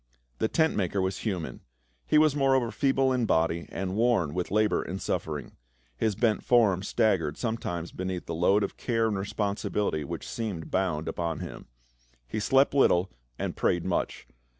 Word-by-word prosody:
The - - +2
tent 160 +5 +2
maker 95 0 0
was 95 0 -1
human. 95 -7 -4 0.5
He - - +4
was 155 -2 +5
moreover 135 -4 +2
feeble 135 -1 +2
in 125 -3 +1
body 80 0 +1
and 95 0 -3
worn 110 -10 +2
with 90 0 -2
labor 105 +2 +2
and 95 +3 -5
suffering; - - -3 0.4
his 105 - 0
bent 110 0 +1
form 110 -7 +4
staggered 95 -8 +1
sometimes 90 -8 -3
beneath 95 -1 -4
the 85 - -4
load 95 +5 +3
of 100 - -4
care 115 -2 0
and 105 - -1
responsibility 100 -4 -1
which 70 - -6
seemed 105 -8 -4
bound 90 -5 0
upon 85 -3 -2
him. - - -8 0.6
He 110 - -3
slept 135 +6 +3
little 95 -10 +3 0.3
and - - -3
prayed 85 -1 +1
much. 90 -2 -2
100 Hz, 165 wpm, -28 LUFS, 90-115 Hz, 0.6 s, was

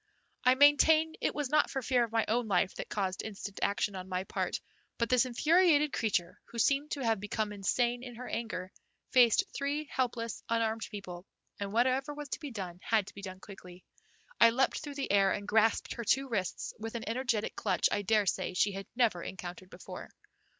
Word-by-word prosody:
I 255 +1 +5
maintain 310 +3 +5
it - - 0
was 290 -3 -2
not 305 - +4
fear 250 -2 +1
for - - -21
my 225 -1 +1
own 235 +1 0
life 190 -1 +1
that - - -5
caused 190 -3 -2
instant 200 -2 -7
action 200 0 0
on 185 0 -7
my 185 0 -1
part, - - -2 0.4
but 235 -1 0
this 250 0 +4
infuriated 300 +3 +3
creature, 185 -6 -1
who 235 - -11
seemed 280 +5 +2
to 280 - -4
have 225 -2 +2
become 210 +1 -2
insane 240 +5 0
in 250 -1 -9
her 250 +2 -8
anger, 185 -5 -4 0.4
faced 250 +7 +5
three 285 +2 -1
helpless, 240 -3 -2
unarmed 225 -1 0
people, 185 -3 -8 0.3
and 200 -1 -3
whatever 260 +6 +1
was 295 -1 -7
to - - -4
be 295 -3 -6
done 185 -7 -6
had 220 -3 +1
to - - -12
be 200 - -10
done 185 -1 -8
quickly. 180 -3 -12 0.6
I 230 - +8
leaped 260 +3 +1
through 290 -2 -7
the 275 - -2
air, 195 -1 +4
and 205 -1 -5
grasped 220 +1 +2
her 235 - -5
two 270 +5 +2
wrists 200 -7 -3
with 225 +1 -6
an 230 - -5
energetic 230 -2 -1
clutch - - +1
I 205 - 0
daresay 205 -3 +1
she 200 +3 +3
had 195 0 -7
never 230 -8 +2
encountered 180 0 -7
before. - - -9
225 Hz, 195 wpm, -31 LUFS, 200-260 Hz, 0.6 s, I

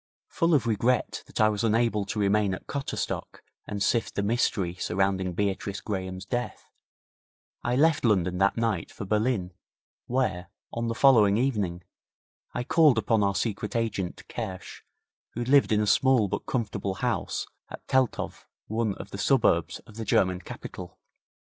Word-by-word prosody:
Full 165 -1 +2
of 135 - +2
regret 115 +2 +1
that - - -7
I 110 - +6
was 105 0 -2
unable 115 -2 +2
to 105 - -5
remain 100 -1 +2
at - - -12
Cotterstock 140 -1 -4 0.2
and 100 -1 -2
sift 115 +4 0
the 100 - 0
mystery 100 -4 0
surrounding 95 0 0
Beatrice 100 +1 -2
Graham's 95 -2 -4
death, 120 +4 -4 0.9
I 120 +1 0
left 155 +2 +3
London 90 -6 +2
that 100 +3 +3
night 115 -7 -1
for - - -7
Berlin, 105 -3 0 0.5
where, 120 -9 -1 0.3
on 115 0 -2
the 115 - -2
following 110 -7 +5
evening, 105 -9 -1 0.7
I 120 - -3
called 150 -2 +4
upon 110 -1 +2
our 100 -1 +1
secret 105 +1 -2
agent, 105 -6 -2
Kersch, 100 -6 -6 0.5
who 120 - -2
lived 140 0 +4
in 105 -1 +3
a - - +1
small 125 0 +4
but - - -4
comfortable 105 -5 -2
house 95 - -2 0.2
at - - -10
Teltow, 130 -2 +1 0.3
one 110 -2 -1
of - - -10
the 100 - -6
suburbs 100 - +2
of 110 - -14
the 115 - -3
German 90 -2 +2
capital. 90 0 -9
105 Hz, 155 wpm, -27 LUFS, 95-120 Hz, 0.9 s, I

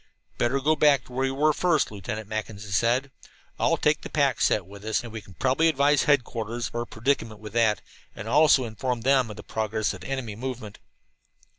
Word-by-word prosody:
"Better 130 +3 +1
go 155 +3 +2
back 145 -3 +4
to 125 - -14
where 130 +1 0
we - - 0
were 150 +3 +2
first," 170 -5 +1
Lieutenant 105 +1 -6
Mackinson 110 -1 -5
said 120 +7 +2
at 140 - -23 0.5
last. - - +2
"We'll - - +2
take 150 0 +1
the - - -8
pack 140 -5 +1
set 105 - +2
with 100 +2 -13
us, 110 +2 -1
and 115 -2 -9
we 110 - -5
can 95 -2 -16
probably 135 - +2
advise 145 -1 +3
headquarters 120 -5 0
of - - -16
our 120 0 -2
predicament 115 -2 -1
with 105 -1 -10
that, 110 -3 +2 0.3
and 100 - -7
also 140 0 +5
inform 120 +2 -3
them 130 -1 +3
of 105 - -7
the - - -9
progress 110 -1 -2
of 95 - -10
the - - -8
enemy 130 -6 -4
movement." 120 -3 -6
120 Hz, 220 wpm, -26 LUFS, 110-135 Hz, 0.5 s, also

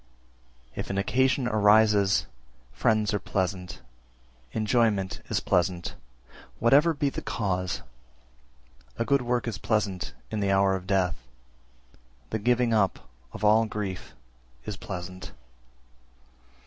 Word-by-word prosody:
331. - - -9
If - - -4
an 100 - -2
occasion 130 +5 +2
arises, 105 -2 +4 0.5
friends 110 - +1
are 105 - +1
pleasant; 90 -2 -3 0.7
enjoyment 110 - +1
is - - +1
pleasant, 90 0 0 0.6
whatever 145 +8 +4
be 145 -1 0
the - - -5
cause; 90 -5 -2 1.1
a - - 0
good 140 +1 +3
work 120 -1 -1
is 105 -3 -3
pleasant 105 -5 -1 0.2
in 110 - -2
the 100 -1 0
hour 95 0 +3
of 95 -1 -6
death; 95 -8 0 1.0
the 110 - -1
giving 120 +1 +2
up 95 - +1 0.2
of 105 0 -4
all 110 +2 +5
grief 100 -4 -5 0.5
is 105 - -4
pleasant. 90 -1 -7
105 Hz, 120 wpm, -27 LUFS, 95-115 Hz, 1.1 s, all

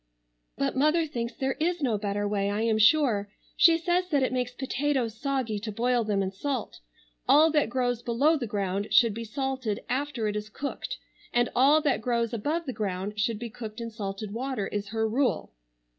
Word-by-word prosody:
"But 140 - -1
mother 305 +5 +3
thinks 235 -5 -4
there 265 0 -1
is 340 0 0
no 240 -5 +2
better 205 0 -1
way 200 -1 0
I 205 +1 -1
am 220 -1 +2
sure. 220 -4 +4 0.3
She 335 -1 +6
says 355 +2 0
that 285 -5 +2
it 255 - 0
makes 250 -1 -1
potatoes 265 -2 -1
soggy 260 -7 -1
to 215 +1 -5
boil 240 +3 +1
them 205 -2 0
in 190 - -2
salt. 255 +5 -4 0.5
All 315 +2 +6
that 295 -6 +2
grows 245 -1 0
below 255 +7 +2
the 260 -6 -3
ground 200 0 -2
should 230 -3 +5
be 230 +2 -5
salted 260 -3 -3
after 265 -4 -1
it 210 - -2
is 210 0 -4
cooked 280 +6 -5 0.3
and 240 0 +2
all 280 +5 +5
that 275 -7 +1
grows 235 0 0
above 300 +10 -1
the 260 - -4
ground 200 0 -3
should 220 +1 +1
be 235 +1 -6
cooked 220 0 -8
in 230 0 -5
salted 200 -1 -5
water, 255 -3 -2
is 205 0 -3
her 220 +1 -1
rule." 250 +4 0
235 Hz, 195 wpm, -27 LUFS, 210-275 Hz, 0.5 s, She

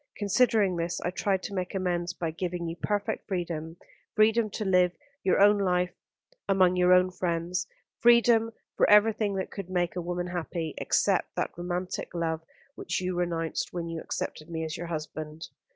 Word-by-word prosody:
Considering 205 -3 +2
this, 170 +1 -2
I 175 - -1
tried 190 0 0
to - - -5
make 185 0 -3
amends 180 -2 -1
by 170 -2 -3
giving 175 +1 -3
you 165 - -4
perfect 205 +3 -2
freedom, 170 -3 -3 0.4
freedom 215 +1 +4
to 215 +1 -4
live 180 -2 +3 0.3
your 190 - +2
own 205 +1 +6
life 180 -2 +1 0.6
among 185 -2 +4
your 180 0 +4
own 180 0 +5
friends, 175 0 -2 0.3
freedom 235 -1 +5 0.2
for - - +3
everything 210 -1 +4
that 190 - -3
could 195 -3 -7
make 175 -2 0
a 180 - -2
woman 175 +1 -3
happy, 170 -2 -4
except - - +1
that - - -2
romantic 180 +1 -4
love 165 -1 -1 0.3
which - - -3
you 185 0 -2
renounced 170 -2 -2
when 170 -1 -3
you 165 -1 -4
accepted 155 +2 -5
me 160 -1 -3
as 160 0 -4
your 175 0 -5
husband. 155 -1 -6
180 Hz, 170 wpm, -28 LUFS, 170-195 Hz, 0.6 s, own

